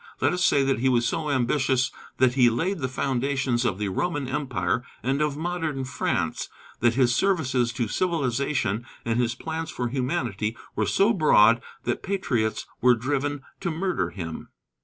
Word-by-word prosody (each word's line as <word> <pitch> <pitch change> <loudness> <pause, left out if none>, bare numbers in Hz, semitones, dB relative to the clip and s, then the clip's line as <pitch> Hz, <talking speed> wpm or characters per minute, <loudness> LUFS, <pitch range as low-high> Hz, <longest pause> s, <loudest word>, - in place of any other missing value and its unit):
Let - - +2
us 180 - 0
say 140 - +4
that 135 -3 +1
he 130 +2 +2
was 120 -2 +2
so 160 -2 -2
ambitious 130 0 +1 0.3
that 130 -1 +4
he 125 -2 +5
laid 170 +11 -1
the 130 - -1
foundations 130 -1 0
of 105 -6 0
the 105 -1 -2
Roman 145 - -1
Empire 130 -3 -1 0.2
and 135 +3 0
of 150 -1 0
modern 160 -4 -2
France; 130 -3 -2 0.3
that 120 0 +3
his 125 -2 +3
services 130 -9 +1
to 120 -2 -1
civilization 135 - 0 0.2
and 115 0 0
his 120 -1 +1
plans 160 +3 -4
for 125 -4 -3
humanity 120 - -2 0.2
were 110 - 0
so 195 - +3
broad 120 - +5 0.2
that 120 - -1
patriots 130 - -1 0.2
were 125 0 +6
driven 140 +3 -2 0.2
to 195 - -2
murder 175 +3 -1
him. 80 -4 -6
130 Hz, 165 wpm, -25 LUFS, 120-150 Hz, 0.3 s, were